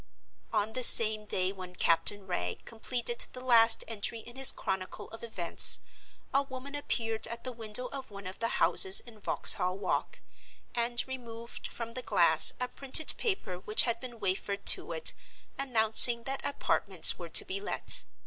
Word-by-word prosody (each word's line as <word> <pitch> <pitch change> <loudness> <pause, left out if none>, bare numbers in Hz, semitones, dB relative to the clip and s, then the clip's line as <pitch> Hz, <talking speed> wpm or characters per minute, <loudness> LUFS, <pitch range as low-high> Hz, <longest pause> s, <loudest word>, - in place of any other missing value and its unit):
On 215 +2 -3
the 255 - -4
same 215 -3 +7
day 185 -2 -2
when 185 -2 -12
Captain 190 +4 0
Wragge 90 - -6
completed 240 +1 -5
the 255 - -10
last 235 -3 +2
entry 225 +1 -5
in 240 +2 -13
his 270 0 +4
Chronicle 185 -1 -7
of 225 - -13
Events, 185 -7 +2 0.5
a 275 - +1
woman 270 0 -11
appeared 225 -6 -3
at 235 0 -10
the 255 - -6
window 225 +1 -6
of 265 +1 -10
one 200 -1 -13
of 185 +1 -10
the 230 - -3
houses 385 +10 +3
in 230 -3 -17
Vauxhall 185 -2 +2
Walk, 195 -2 -5 0.5
and 240 +1 -1
removed 235 -3 -10
from 230 -1 -10
the 255 - -7
glass 170 -8 +3
a 250 - -4
printed 275 +4 +4
paper 220 - -5
which 210 +3 +1
had 235 -1 -2
been 240 -2 -11
wafered 200 +1 -5
to - - +6
it 480 - -3 0.5
announcing 235 -2 +5
that 270 +2 -6
Apartments 285 - +1
were - - -10
to - - +1
be 390 +1 -6
let. - - 0
230 Hz, 170 wpm, -27 LUFS, 205-255 Hz, 0.5 s, same